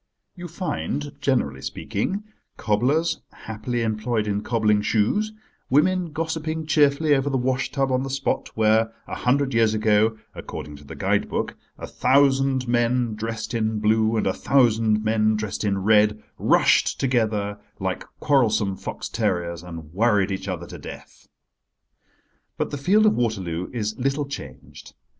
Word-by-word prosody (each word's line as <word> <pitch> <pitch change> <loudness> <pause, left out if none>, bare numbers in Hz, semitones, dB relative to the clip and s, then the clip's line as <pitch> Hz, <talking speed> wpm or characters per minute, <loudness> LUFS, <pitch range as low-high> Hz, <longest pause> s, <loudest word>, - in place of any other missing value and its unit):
You 175 -1 -7
find, 150 -4 -3
generally 125 - 0
speaking, 190 - -3 0.3
cobblers 145 +10 +1
happily 115 +2 -4
employed 110 0 -1
in 105 -1 -1
cobbling 105 -2 +2
shoes, 110 - +1 0.4
women 175 +5 +2
gossipping 160 0 -3
cheerfully 150 0 +3
over 140 0 +1
the 135 - 0
washtub 130 +1 0
on 130 0 +1
the 135 - -4
spot 135 +1 -1
where 110 0 +3
a - - -8
hundred 135 +2 +1
years 115 -1 +3
ago, 110 +1 +2 0.2
according 75 - -7
to 70 - -15
the 70 - -10
guide - - 0
book, - - -2 0.2
a - - -6
thousand 135 -1 +2
men 120 0 +1
dressed 110 +2 -4
in 110 -1 0
blue 110 +1 +2
and - - 0
a - - +1
thousand 110 -5 +2
men 110 0 +2
dressed 105 -1 -3
in 100 -2 0
red 105 0 +3 0.2
rushed - - +3
together 110 -5 0 0.2
like - - -2 0.2
quarrelsome 110 -8 +2
fox - - -6
terriers, 85 -1 -1
and 85 -3 -9
worried 105 -1 +2
each 95 0 -4
other 90 -3 -4
to - - -10
death. - - -11 1.3
But - - -2
the 145 - -3
field 205 +9 +4
of 215 - +5
Waterloo 95 -7 -2
is 110 -2 -3
little 135 +3 0
changed. 70 - -10
115 Hz, 150 wpm, -23 LUFS, 105-135 Hz, 1.3 s, of